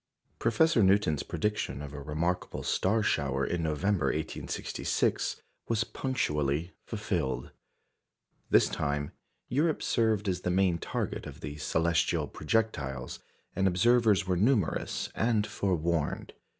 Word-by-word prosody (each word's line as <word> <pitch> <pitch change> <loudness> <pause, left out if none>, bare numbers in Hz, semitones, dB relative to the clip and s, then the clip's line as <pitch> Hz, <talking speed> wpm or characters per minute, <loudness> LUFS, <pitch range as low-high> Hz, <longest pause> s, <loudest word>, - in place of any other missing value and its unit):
Professor 115 +4 +3
Newton's 95 -6 +3
prediction 105 -10 -2
of 70 -1 -7
a 70 - -6
remarkable 80 +5 -2
star 110 +4 +1
shower - - +1
in 90 - -1
November, 80 +1 +1
1866, 75 +3 -1 0.3
was 110 -2 +1
punctually 75 - -1
fulfilled. 90 - -2 1.0
This - - +5
time, 70 0 -2 0.4
Europe 155 +5 +1
served 110 -3 +1
as 90 -1 0
the 90 - -1
main 90 -2 +2
target - - -3
of - - -10
the 75 -1 -6
celestial 80 +1 +1
projectiles, 75 - -2 0.4
and 95 +1 +2
observers 105 +2 +4
were 90 -1 +1
numerous 105 -1 +1
and 110 -2 +1
forewarned. 85 -6 -1
90 Hz, 115 wpm, -30 LUFS, 75-110 Hz, 1.0 s, This